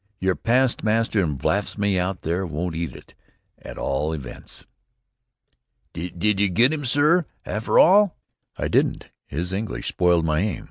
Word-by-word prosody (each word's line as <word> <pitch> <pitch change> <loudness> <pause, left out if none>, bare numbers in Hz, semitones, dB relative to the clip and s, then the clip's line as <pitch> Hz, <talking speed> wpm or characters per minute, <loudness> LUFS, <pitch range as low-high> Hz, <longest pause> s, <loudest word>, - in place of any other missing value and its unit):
Your 95 0 +1
past 125 +1 +1
master 110 -1 +1
in 75 -5 -1
blasphemy 100 +5 0
out 90 +1 -3
there 85 +4 -1
won't 85 0 -3
eat 85 0 -4
it, - - -14 0.5
at - - -10
all 75 +4 -1
events." 70 -6 -8 1.3
"Did 90 +4 -1
ye 100 -1 +3
get 120 - +4
him, 145 -3 -3
sorr, 150 +6 +3 0.2
afther 110 +2 -1
all?" 200 +1 +5 0.4
"I - - -2
didn't. - - 0 0.2
His 85 +6 -4
English 105 +2 -3
spoiled 85 -2 +2
my 75 -1 +1
aim. 100 -2 -1
95 Hz, 150 wpm, -23 LUFS, 85-115 Hz, 1.3 s, all